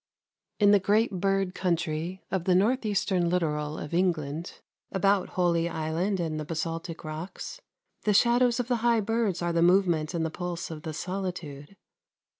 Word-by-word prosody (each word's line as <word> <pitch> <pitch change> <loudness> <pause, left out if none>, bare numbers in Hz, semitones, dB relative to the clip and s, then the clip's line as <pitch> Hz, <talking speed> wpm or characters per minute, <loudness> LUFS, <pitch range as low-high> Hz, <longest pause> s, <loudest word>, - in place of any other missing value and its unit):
In 205 -1 +6
the 205 - +6
great 210 +4 +2
bird 195 -1 +1
country 175 0 -2
of 190 -3 -1
the 185 - +4
north 225 +5 +2
eastern 190 -4 +1
littoral 150 -4 -1
of 150 - -7
England, 165 -3 -1 0.3
about 195 0 +2
Holy 170 -2 +2
Island 165 +5 -1
and 160 -2 -2
the - - -3
basaltic 165 +1 -4
rocks, 170 - -7 0.4
the 210 - +2
shadows 240 +2 +4
of 245 - -1
the 245 -1 +1
high 230 -1 +2
birds 215 -4 0
are 175 0 0
the 170 - +2
movement 175 -3 +3
and 165 -1 0
the 160 - -3
pulse 175 0 -4
of 155 -1 -7
the 160 0 -5
solitude. 180 -3 -5
180 Hz, 165 wpm, -28 LUFS, 165-200 Hz, 0.4 s, In